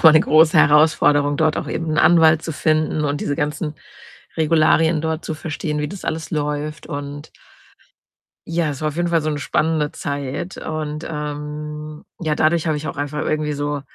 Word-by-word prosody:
noch - - -11
mal 160 - +9
'ne 155 - +6
große 155 +1 +4
Herausforderung, 150 -1 +4
dort 155 0 +2
auch - - -3
eben 165 -1 -3
'n 155 - 0
Anwalt 160 -1 +5
zu 165 - -4
finden 155 0 0
und 145 0 -1
diese 145 - -2
ganzen 150 0 -2 0.6
Regularien 160 0 +3
dort 160 +1 -3
zu 160 - -3
verstehen, 155 -1 -4
wie 150 - -2
das 195 +4 -9
alles 160 0 -3
läuft. 150 0 -3
Und 145 -1 -6 1.2
ja, 165 -1 0
es 140 -1 -6
war 155 - 0
auf 150 - -9
jeden 175 0 +1
Fall 170 -1 +2
so 155 - -1
'ne 150 -1 -2
spannende 155 +1 0
Zeit. 140 +5 -4
Und, 155 0 -4
ähm, 150 0 -6 0.2
ja, 155 -3 -1
dadurch 160 +2 +2
habe 155 - +1
ich 150 +1 -4
auch - - -6
einfach 145 +1 -3
irgendwie 155 -1 -1
so 145 0 -2
155 Hz, 190 wpm, -20 LUFS, 150-160 Hz, 1.2 s, mal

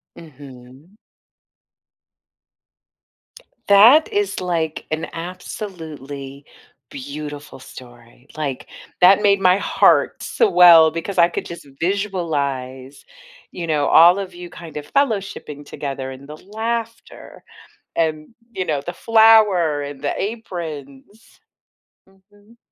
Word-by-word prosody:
Mhm. 140 +2 -15 2.7
That 225 +10 +6
is, 410 -1 -1
like, 165 -4 -3
an 155 +1 -3
absolutely 160 - -8 0.4
beautiful 145 +1 -9
story. 120 0 -15
Like, 140 -4 -5 0.3
that 190 +3 +6
made 200 -1 +3
my 185 -1 +4
heart - - +2
swell 175 - +5
because 165 +5 -6
I 170 0 +5
could - - -5
just 170 -3 -10
visualize, 145 -9 -3 0.5
you 170 -2 -6
know, 150 -3 0
all 175 +3 +6
of 190 -2 -7
you 175 0 -10
kind 160 -3 -11
of 145 0 -9
fellowshipping 195 - -2
together, 135 -2 -6
and 135 +1 -12
the 150 +1 -10
laughter 230 +3 -6 0.5
and, 155 +4 -2 0.2
you 185 - -3
know, 150 -5 -2
the 175 - -4
flour, 210 -9 +3
and 140 -1 -8
the - - -2
aprons. 175 - -8 0.7
Mhm. 205 +4 -25
165 Hz, 105 wpm, -20 LUFS, 145-200 Hz, 2.7 s, That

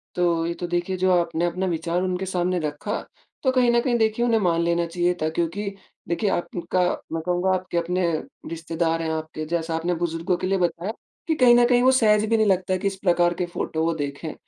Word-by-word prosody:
तो 170 -2 +1
ये 170 - -2
तो 175 - -5
देखिए, 175 +2 -1
जो 185 +1 +2
आपने 170 0 -1
अपना 180 +2 -1
विचार 170 0 -1
उनके 185 0 -2
सामने 180 -1 0
रखा, 150 -1 -3 0.4
तो 260 - +3
कहीं 250 -2 +3
न 235 0 +4
कहीं 240 0 +1
देखिए 220 +1 +1
उन्हें 230 -2 +3
मान 170 -4 +2
लेना 170 0 +1
चाहिए 175 +1 0
था 155 - +2
क्योंकि 170 +5 -2 0.4
देखिए 195 +5 0
आपका 175 0 -2 0.3
मैं 165 0 -2
कहूँगा 180 +2 0
आपके 185 -2 -2
अपने 180 +1 0 0.4
रिश्तेदार 165 0 -1
हैं 160 - -2
आपके 155 0 -4
जैसा 165 0 -2
आपने 170 +2 -1
बुजुर्गों 170 +1 -1
के 185 - -3
लिए 195 +1 +1
बताया 175 +3 -1 0.4
कि 320 - +3
कहीं 250 -5 +6
न 240 0 +6
कहीं 245 -1 +4
वो 260 +1 +5
सहज 215 -4 +4
भी 225 - +3
नहीं 220 -1 +3
लगता 185 -1 +1
कि 185 - -4
इस 195 -1 0
प्रकार 175 -2 +3
के 175 +1 -2
फोटो 160 -2 -3
वो 165 0 +1
देखेंI 145 +1 -5
175 Hz, 220 wpm, -24 LUFS, 165-190 Hz, 0.4 s, कहीं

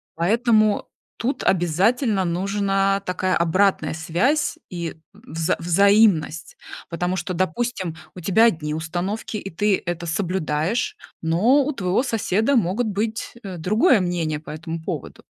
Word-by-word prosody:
Поэтому 215 +4 +2 0.3
тут 260 +5 -2
обязательно 195 - +2
нужна 195 +2 +1
такая 185 -1 -1
обратная 170 -2 +2
связь 185 - 0
и 170 -3 -5 0.2
вза 180 -7 -2
взаимность. 175 -2 +3 0.3
Потому 175 +2 -1
что, 185 0 -3
допустим, 185 0 -2 0.2
у - - -8
тебя 195 +7 +4
одни 155 -8 0
установки 175 +7 -3
и 195 - -6
ты 200 +3 +1
это 175 0 -3
соблюдаешь, 180 - -1 0.3
но 215 - +3
у 300 - -1
твоего 190 +2 0
соседа 225 +1 +1
могут 220 +3 +1
быть, 215 +2 -3
э, 185 -3 -6
другое 215 - +3
мнение 165 -4 -1
по 155 - -13
этому 160 +1 -6
поводу. - - -6
190 Hz, 130 wpm, -22 LUFS, 170-220 Hz, 0.3 s, тебя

